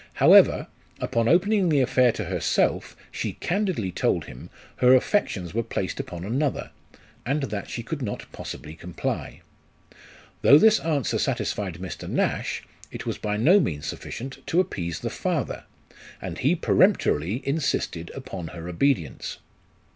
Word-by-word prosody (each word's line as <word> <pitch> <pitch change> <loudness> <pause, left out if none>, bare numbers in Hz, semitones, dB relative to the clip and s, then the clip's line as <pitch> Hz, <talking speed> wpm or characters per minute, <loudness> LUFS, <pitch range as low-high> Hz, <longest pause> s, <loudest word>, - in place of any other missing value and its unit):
However, - - +6 0.3
upon 115 -1 0
opening 190 - +3
the 150 -3 +3
affair 130 -1 +4
to 110 - -4
herself, 90 -2 0 0.2
she - - -3
candidly 175 - -1
told - - 0
him 65 - -11 0.3
her 125 +1 +6
affections 110 - 0
were 115 - +1
placed 105 -4 -3
upon 85 0 -5
another, 135 +7 -1 0.5
and 140 +3 -1
that 105 -6 -4
she 120 - -5
could 150 +4 -5
not 105 -5 -4
possibly 75 +1 -8
comply. 85 +2 -5 1.0
Though 145 - +8
this 215 +6 +6
answer 150 -6 0
satisfied 95 -5 -1
Mr. 90 +2 -7
Nash, - - -1 0.3
it - - -7
was - - -3
by 105 0 -2
no 170 - +6
means 75 - -2
sufficient 135 +3 -6
to 170 - +2
appease 85 - -2
the - - -3
father; - - -2 0.5
and - - -6
he - - +3
peremptorily 95 - +2
insisted 135 - -1
upon 100 -11 -6
her 85 0 -8
obedience. 90 - -1
115 Hz, 140 wpm, -25 LUFS, 90-145 Hz, 1.0 s, Though